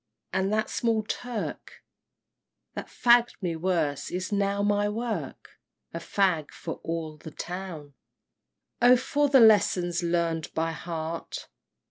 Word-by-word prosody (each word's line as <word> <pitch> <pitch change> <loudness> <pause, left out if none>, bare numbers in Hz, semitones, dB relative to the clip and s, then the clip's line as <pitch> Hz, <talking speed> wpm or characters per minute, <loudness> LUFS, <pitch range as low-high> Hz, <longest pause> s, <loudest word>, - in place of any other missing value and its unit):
and 190 +1 +1
that 215 0 +1
small 225 -2 0
Turk 240 +1 -5 0.9
That - - -6
fagg'd 240 0 +4
me! 175 -4 -2
worse 160 -4 -1
is 185 +2 -4
now 200 0 +1
my 205 0 +2
work 230 +2 -5 0.3
A - - -3
fag 180 -7 +1
for - - -6
all 160 -2 -4
the 160 - -9
town! 170 -3 -7 0.9
XIII. 245 +1 +8
Oh - - +6
for 285 +3 +1
the 270 -1 +6
lessons 185 -5 +4
learned 170 -2 -1
by 165 0 0
heart! 165 0 -5
185 Hz, 130 wpm, -27 LUFS, 165-215 Hz, 0.9 s, XIII